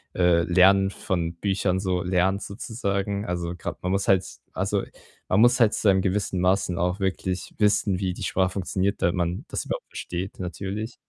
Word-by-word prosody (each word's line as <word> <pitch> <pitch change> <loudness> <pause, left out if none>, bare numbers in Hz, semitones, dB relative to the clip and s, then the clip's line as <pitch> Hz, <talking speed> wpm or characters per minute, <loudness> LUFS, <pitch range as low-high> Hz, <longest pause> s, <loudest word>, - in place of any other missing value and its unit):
äh, 90 -2 +4
Lernen 95 +3 +5
von 85 -4 -3
Büchern 95 0 0
so 90 -2 0
lernt 95 +2 +1
sozusagen. 100 -2 -3
Also, 85 -1 -2
grad 85 - -7
man 90 - 0
muss 95 0 0
halt 95 -1 +4 0.3
also, - - 0 0.5
man 95 - +3
muss 120 +2 +5
halt 115 -2 +4
zu 105 - +2
einem 95 0 +2
gewissen 95 -1 -1
Maßen 90 -1 +1
auch 90 +2 0
wirklich 95 -1 -2
wissen, 100 -2 +2
wie 95 -2 -1
die - - -7
Sprache 95 -1 +1
funktioniert, 95 +1 -1
damit 85 - +3
man 85 0 -2
das - - -4
überhaupt - - -4
versteht 90 +2 -5
natürlich. 100 +5 -5
95 Hz, 180 wpm, -25 LUFS, 90-100 Hz, 0.5 s, Lernen